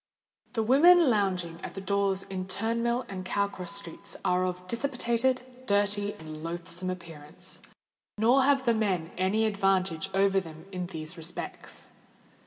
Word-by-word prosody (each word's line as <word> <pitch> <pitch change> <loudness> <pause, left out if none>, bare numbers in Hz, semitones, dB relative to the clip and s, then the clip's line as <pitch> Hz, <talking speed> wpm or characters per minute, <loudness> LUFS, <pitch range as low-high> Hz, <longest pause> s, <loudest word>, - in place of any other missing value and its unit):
The 225 -2 +1
women 310 +5 +7
lounging 185 -5 0
at - - -7
the - - -4
doors 195 0 0
in 185 -1 -5
Turnmill 230 +5 0
and 190 -2 -5
Cow 200 +2 +1
Cross 185 -2 -5
Streets 185 -5 -7
are 180 0 +3
of 180 0 -5
dissipated, 250 +1 +1 0.2
dirty, 205 0 +2
and 155 -1 -9
loathsome 175 +2 -3
appearance: 165 -4 -8 0.6
nor 240 +5 +5
have 270 0 +3
the 235 - +4
men 190 -7 0
any 190 +5 +2
advantage 195 -4 +1
over 195 0 +4
them 160 -3 -10
in 180 -2 -3
these 160 0 -6
respects. 165 +1 -6
195 Hz, 145 wpm, -29 LUFS, 180-225 Hz, 0.6 s, women